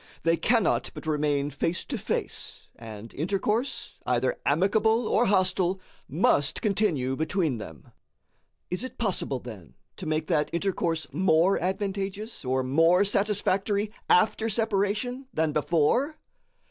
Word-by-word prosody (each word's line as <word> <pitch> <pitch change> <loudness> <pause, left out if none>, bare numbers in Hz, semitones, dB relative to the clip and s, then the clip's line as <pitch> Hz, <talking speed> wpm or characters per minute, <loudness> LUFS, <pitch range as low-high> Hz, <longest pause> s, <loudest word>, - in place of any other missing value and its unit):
They 165 0 +3
cannot 225 +4 +2
but - - -8
remain 150 -2 0
face 165 +3 -2
to - - -4
face, - - -4
and 110 -1 -10
intercourse, 205 - -1
either - - 0
amicable 215 +8 +2
or - - +3
hostile, 185 -1 +2 0.3
must 145 -1 +2
continue 180 - 0
between 160 - -1
them. 80 -8 -11 0.8
Is 180 +6 -1
it 255 - -7
possible, 180 - -1
then, 110 - -11 0.2
to - - -6
make 155 0 0
that 150 -1 +1
intercourse 170 -3 -1
more 175 +2 +3
advantageous 195 +3 -3
or 130 0 0
more 165 +8 +4
satisfactory 205 0 +1 0.2
after 220 +4 +3
separation 220 +4 -1
than 160 -1 +1
before? 170 - +1
185 Hz, 120 wpm, -27 LUFS, 150-205 Hz, 0.8 s, more